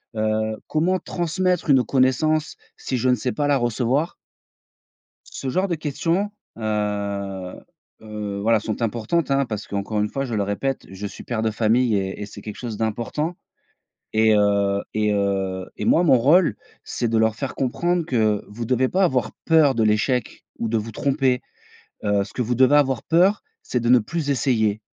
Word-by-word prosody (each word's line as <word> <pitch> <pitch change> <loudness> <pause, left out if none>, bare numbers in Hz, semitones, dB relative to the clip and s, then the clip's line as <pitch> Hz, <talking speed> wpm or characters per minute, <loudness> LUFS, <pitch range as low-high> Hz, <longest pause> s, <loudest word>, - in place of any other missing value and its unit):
Heu, 110 0 0
comment 170 +4 +1
transmettre 180 0 -1
une 135 -3 +5
connaissance, 140 +5 +1 0.2
si 130 - -3
je 130 +2 +1
ne 125 - +4
sais 125 0 -2
pas 145 +2 -1
la 145 -1 +3
recevoir? 125 +6 0 1.1
Ce 135 - -6
genre 185 +8 0
de 175 - 0
questions, 165 +6 -1 0.3
heu, 100 -3 -3 0.5
heu, 105 -2 -5
voilà 110 +1 +3
sont 110 +2 -4
importantes, 120 +9 -1
hein, 140 0 +3
parce 110 -3 -5
qu'encore 100 +1 -2
une 105 - +1
fois, 135 +5 -3
je 120 -4 -4
le 105 - +1
répète, 100 +7 -2
je 95 +2 -6
suis - - -9
père 115 -3 -2
de 110 - +1
famille 110 +1 +2
et 95 0 -3
et - - -4
c'est 100 0 -11
quelque 105 - -7
chose 115 -4 -5
d'important 120 +10 -2 0.8
et 110 0 +4
heu, 100 -1 +2
et 105 -1 +1
heu, 95 -2 -1
et - - -4
moi, 170 - +4
mon 145 - +6
rôle, 145 - +4 0.3
c'est 120 - -2
de 115 0 +1
leur 110 0 +2
faire 135 +4 -5
comprendre 170 +7 0
que: 110 -6 +1
«Vous 115 +3 -6
devez 130 +2 +1
pas 190 +6 +2
avoir 125 -9 0
peur 155 -4 +4
de 115 - +1
l'échec 110 +3 0
ou 115 - -2
de 115 0 +1
vous 110 +1 -6
tromper. 135 0 +1 0.6
Heu, 100 -1 +2
ce 100 - -12
que - - -2
vous 120 +1 0
devez 130 +3 +5
avoir 135 -4 +3
peur, 185 +5 +3 0.2
c'est 125 - -1
de 120 0 -1
ne 125 0 +7
plus 145 +7 -3
essayer». 110 -6 +1
120 Hz, 185 wpm, -22 LUFS, 105-140 Hz, 1.1 s, ne